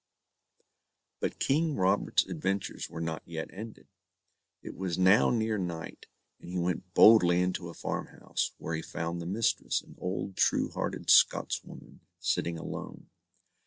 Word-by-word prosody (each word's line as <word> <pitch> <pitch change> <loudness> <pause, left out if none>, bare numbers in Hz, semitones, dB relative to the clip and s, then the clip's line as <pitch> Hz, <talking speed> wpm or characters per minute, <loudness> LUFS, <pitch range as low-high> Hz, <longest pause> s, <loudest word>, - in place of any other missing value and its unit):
But - - -2
King 155 +2 +1
Robert's 95 +2 +2
adventures 95 +1 -3
were 80 - -6
not 80 -1 -3
yet 80 -1 -6
ended. 110 +3 -9 0.8
It - - -8
was 95 -3 -3
now 95 +5 +5
near 110 -3 0
night, 85 -3 -6 0.3
and - - -11
he 90 - -3
went 90 +1 -2
boldy 90 -6 +7
into 90 -1 -1
a 85 - -10
farmhouse, - - -3
where 80 - -5
he 80 - -2
found 85 +1 -4
the 85 - -6
mistress, 105 +5 0
an - - -15
old, 95 +1 -4
true - - +2
hearted - - -1
Scotswoman, - - +2 0.2
sitting 85 0 -1
alone. 80 - -8
90 Hz, 140 wpm, -30 LUFS, 85-100 Hz, 0.8 s, boldy